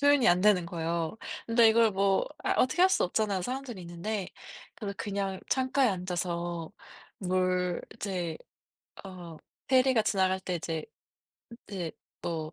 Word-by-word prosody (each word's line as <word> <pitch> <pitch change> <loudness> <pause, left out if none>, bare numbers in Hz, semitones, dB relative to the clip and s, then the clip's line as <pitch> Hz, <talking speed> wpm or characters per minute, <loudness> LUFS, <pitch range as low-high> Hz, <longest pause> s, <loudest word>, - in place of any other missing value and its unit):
표현이 285 -3 +5
안 175 +1 +5
되는 195 -4 +4
거예요. 170 +3 -2 0.3
근데 230 0 +6
이걸 225 0 +5
뭐 195 - +2 0.2
아 - - +1
어떻게 260 +7 +2
할 370 - +8
수 380 - +3
없잖아요 195 0 0
사람들이 250 -4 -4
있는데. 180 +4 -4 0.5
그래서 200 -3 -5
그냥 195 -2 -3
창가에 260 0 +3
앉아서 175 -2 -3 0.5
뭘 185 -1 0
이제 180 -5 -3 0.7
어 175 -4 -9 0.3
페리가 255 -3 +4
지나갈 190 -2 +2
때 185 -1 -3
이제 160 -2 -3 0.8
이제 180 -5 -4 0.3
뭐 160 -2 -3
190 Hz, 280 characters per minute, -29 LUFS, 175-220 Hz, 0.8 s, 할